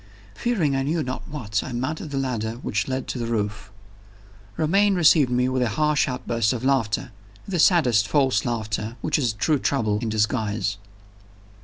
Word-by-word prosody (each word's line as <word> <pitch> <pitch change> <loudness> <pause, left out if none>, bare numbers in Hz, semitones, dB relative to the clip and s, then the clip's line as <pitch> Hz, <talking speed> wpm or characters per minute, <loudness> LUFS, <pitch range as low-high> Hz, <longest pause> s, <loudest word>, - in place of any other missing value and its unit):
Fearing 160 - 0
I 135 - +1
knew 155 +4 0
not 130 0 -6
what, 110 -9 -2
I 130 - -6
mounted 140 +6 -3
the 140 - -4
ladder 120 -5 -2
which 110 - -1
led 130 0 -3
to 125 - -3
the 115 - -2
roof. 105 -3 -3 0.9
Romayne 195 +6 +3
received 160 -5 +5
me 125 0 +1
with 130 0 0
a 120 - +1
harsh 150 +5 +1
outburst 120 -4 -1
of 125 -1 -5
laughter 130 -3 0 0.4
that 185 -3 -2
saddest 125 - +4
false 135 +2 +2
laughter 110 -1 -3
which 155 - 0
is 125 -5 +1
true 145 +7 +1
trouble 110 -8 0
in 115 -1 -3
disguise. 105 -2 0
125 Hz, 170 wpm, -24 LUFS, 110-145 Hz, 0.9 s, received